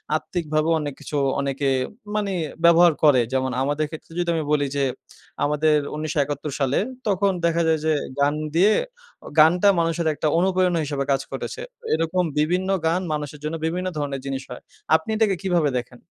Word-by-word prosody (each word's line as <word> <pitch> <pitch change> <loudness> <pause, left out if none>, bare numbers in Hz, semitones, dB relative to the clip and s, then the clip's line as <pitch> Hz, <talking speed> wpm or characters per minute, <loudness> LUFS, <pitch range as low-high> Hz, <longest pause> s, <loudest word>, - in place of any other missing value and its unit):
আত্মিকভাবেও 155 -1 -1
অনেক 145 -1 -4
কিছু - - -7 0.2
অনেকে 140 0 -1 0.5
মানি 205 -2 0 0.3
ব্যবহার 170 0 +7
করে, 145 -5 +6
যেমন 130 0 0
আমাদের 145 +3 0
ক্ষেত্রে 160 +1 -10
যদি 175 -1 0
আমি 160 - -1
বলি 145 -1 +2
যে 140 - +1 0.6
আমাদের 150 +1 +2 0.2
১৯৭১ 150 -1 -2
সালে 135 -1 +1 0.3
তখন 200 0 +2
দেখা 170 0 +2
যায় 160 -1 +2
যে 160 - +3 0.3
গান 145 +1 +3 0.2
দিয়ে 195 +6 +5 0.5
অ - - -9
গানটা 175 +6 +6
মানুষের 165 0 0
একটা 155 - -2
অনুপ্রেরণা 180 -1 +2
হিসেবে 140 -1 -2
কাজ 135 - +2
করেছে। - - -5 0.3
এরকম 175 +3 +1 0.2
বিভিন্ন 180 +5 +1 0.2
গান 170 +3 +1
মানুষের 150 0 -5
জন্য 155 +2 -3
বিভিন্ন 180 +3 -2
ধরণের 140 -2 -3
জিনিস 135 -1 -3
হয়। 125 - -8 0.3
আপনি 160 +6 -1
এটাকে 215 -3 +2
কিভাবে 175 -6 +2
দেখেন? 125 0 -11
155 Hz, 165 wpm, -23 LUFS, 145-175 Hz, 0.6 s, ব্যবহার